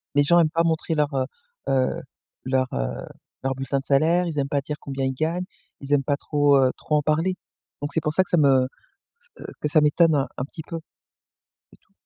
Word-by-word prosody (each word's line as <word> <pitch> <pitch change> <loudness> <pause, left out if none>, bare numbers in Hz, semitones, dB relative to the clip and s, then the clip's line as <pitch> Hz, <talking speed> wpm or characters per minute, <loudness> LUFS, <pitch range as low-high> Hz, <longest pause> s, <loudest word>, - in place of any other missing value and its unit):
Les 145 - +5
gens 170 +4 +5
aiment 160 -2 +4
pas 165 +1 +1
montrer 160 0 0
leur 150 -1 0
heu 130 -1 0 0.4
heu, 130 -1 +1 0.4
leur 130 0 +1
heu, - - -1 0.6
leur 135 0 0
bulletins 135 +1 -2
de 135 - -10
salaire, 165 +6 +3
ils 155 -3 -3
aiment 140 0 -1
pas 140 -1 0
dire 150 +1 -5
combien 135 -1 -4
ils 130 - -1
gagnent, 160 +6 -1 0.4
ils 140 +1 -2
aiment 140 -1 +3
pas 140 0 0
trop, 145 -1 +3
heu, 130 -1 +4
trop 150 - -1
en 150 - +3
parler. 160 +5 +1 0.5
Donc 145 - -2
c'est 160 - +2
pour 150 0 0
ça 185 - +5
que - - -11
ça 175 - +3
me 135 -4 +4 0.5
ç 485 - -7
heu, - - -7
que 150 - -1
ça 150 +1 +5
m'étonne 155 +2 +4
un 140 -2 +1
un 125 - -1
petit 160 +3 -7
peu. 165 - -5 0.9
C'est - - -20
tout. - - -35
145 Hz, 235 wpm, -24 LUFS, 135-160 Hz, 0.9 s, Les